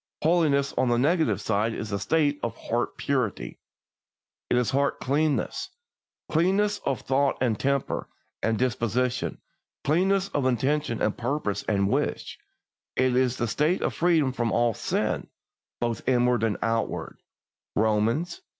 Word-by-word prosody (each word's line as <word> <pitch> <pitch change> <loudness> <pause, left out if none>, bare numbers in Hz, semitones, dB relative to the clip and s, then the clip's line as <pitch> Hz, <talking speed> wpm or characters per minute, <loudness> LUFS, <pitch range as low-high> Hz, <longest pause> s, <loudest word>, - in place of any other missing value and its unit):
Holiness 150 -4 +3
on 130 - +2
its 120 - +3
negative 145 - +2
side 110 +2 0
is 110 -1 -5
a 100 - -1
state 150 0 +1
of 115 -1 -3
heart 120 +1 -2
purity; 130 -7 -2 0.9
it - - +3
is 125 -3 +1
heart 140 +1 +1
cleanness 145 +2 0 0.6
cleanness 195 +5 +2
of 135 - 0
thought 135 +1 +1
and 115 -5 0
temper 140 -1 -1 0.3
and 115 -1 +1
disposition, 125 +1 0 0.5
cleanness 190 +6 +2
of 140 -3 0
intention 130 0 0
and 105 - +1
purpose 120 -5 -1
and 100 -2 +2
wish; - - -2 0.6
it 130 -1 +2
is 130 0 +1
a 120 - 0
state 150 - +1
of - - 0
freedom 165 -6 +2
from 120 -3 -1
all 120 -1 +2
sin, - - -1 0.5
both 120 -1 -1
inward 125 -2 +3
and 110 -3 0
outward 115 0 -2 0.5
(Romans 110 +11 +1
vi. - - -25
130 Hz, 140 wpm, -26 LUFS, 115-150 Hz, 0.9 s, Holiness